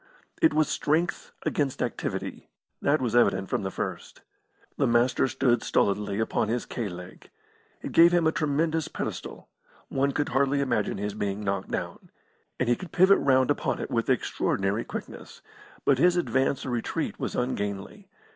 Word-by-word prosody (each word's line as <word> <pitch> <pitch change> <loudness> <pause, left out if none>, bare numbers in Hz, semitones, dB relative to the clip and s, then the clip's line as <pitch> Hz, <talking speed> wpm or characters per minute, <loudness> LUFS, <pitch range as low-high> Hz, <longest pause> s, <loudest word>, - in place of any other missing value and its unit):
It 320 - +6
was 155 -2 +3
strength 160 +5 -1
against 140 -3 -1
activity - - -4 0.3
that 145 +1 +2
was 120 -2 -1
evident 115 -5 +3
from - - 0
the 95 - -2
first. - - -5 0.5
The - - +1
Master 120 +2 +3
stood 120 -3 +1
stolidly 100 0 0
upon 110 -1 0
his 120 +2 -1
K 115 -4 -4
leg. 90 0 -10 0.5
It - - -4
gave 170 +1 +7
him 175 -2 +3
a 160 - +4
tremendous 160 -1 0
pedestal; - - -6 0.4
one 140 +1 +1
could 145 +2 -1
hardly 140 +1 +2
imagine 120 -7 0
his 105 +1 -3
being 100 0 -3
knocked 100 -1 -2
down. - - -5 0.5
And 125 - +1
he 120 - +4
could 185 +3 -9
pivot 190 +2 +5
round 130 -2 +3
upon - - -1
it - - -5
with - - 0
extraordinary 100 +4 0
quickness; - - -8 0.4
but 135 -2 +4
his 175 +3 +4
advance 135 -5 0
or 130 - -3
retreat 120 -2 -2
was - - -3
ungainly. 115 - -3
130 Hz, 165 wpm, -27 LUFS, 105-150 Hz, 0.5 s, gave